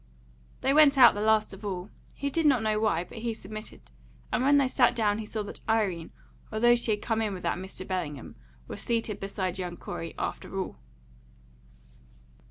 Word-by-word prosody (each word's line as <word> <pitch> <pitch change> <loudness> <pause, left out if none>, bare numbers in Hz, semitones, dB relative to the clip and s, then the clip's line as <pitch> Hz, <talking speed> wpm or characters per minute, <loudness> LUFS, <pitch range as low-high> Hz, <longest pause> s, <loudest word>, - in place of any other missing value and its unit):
They 270 - +2
went 290 -2 +6
out 245 -3 +9
the 205 - -4
last 215 -1 +2
of 195 - -11
all; 190 -1 -4 0.2
he 280 0 -3
did 325 +1 +2
not 255 -6 +4
know 215 -1 +1
why, 215 -6 +1
but 225 - -10
he 230 0 -2
submitted, 215 - -9 0.4
and - - +2
when 285 +2 +5
they 275 -2 +4
sat 255 -1 +3
down 210 -2 +1
he 215 - -6
saw 215 -1 -3
that 205 - -8
Irene, 195 -7 +1 0.4
although 240 +2 +4
she 240 -1 +1
had 210 -1 0
come 225 -1 0
in 210 -3 -1
with 180 - -9
that - - -1
Mr. 190 0 -8
Bellingham, 160 -8 -4 0.3
was - - -7
seated 225 -3 -1
beside 190 -2 -3
young 175 -1 -4
Corey, 165 - -6
after 195 - -4
all. 185 - -4
215 Hz, 190 wpm, -28 LUFS, 190-235 Hz, 0.4 s, out